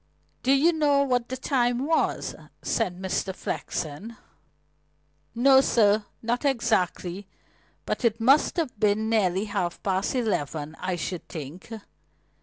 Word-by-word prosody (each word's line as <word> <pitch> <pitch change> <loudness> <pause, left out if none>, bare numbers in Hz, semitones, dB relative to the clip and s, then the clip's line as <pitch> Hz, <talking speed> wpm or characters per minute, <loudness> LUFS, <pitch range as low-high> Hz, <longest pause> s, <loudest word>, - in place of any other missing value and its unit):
"Do 260 - +2
you 295 +5 +4
know 290 -3 +3
what 250 -3 0
the 260 - -3
time 245 -1 0
was?" 320 +1 0 0.3
said 185 -6 -1
Mr. 190 0 -2
Flexen. 185 +10 -5 1.2
"No, 265 +2 +6
sir 210 -4 +3 0.2
not 240 +3 -1
exactly. 205 -7 0 0.6
But - - -3
it 230 -1 +2
must 270 +10 +4
have 290 -10 -2
been 215 +1 +2
nearly 195 -3 +2
half 195 -4 -3
past 190 +4 0
eleven, 155 - -2
I 185 -1 -2
should 175 0 -5
think." 160 +3 -8
220 Hz, 125 wpm, -26 LUFS, 185-255 Hz, 1.2 s, No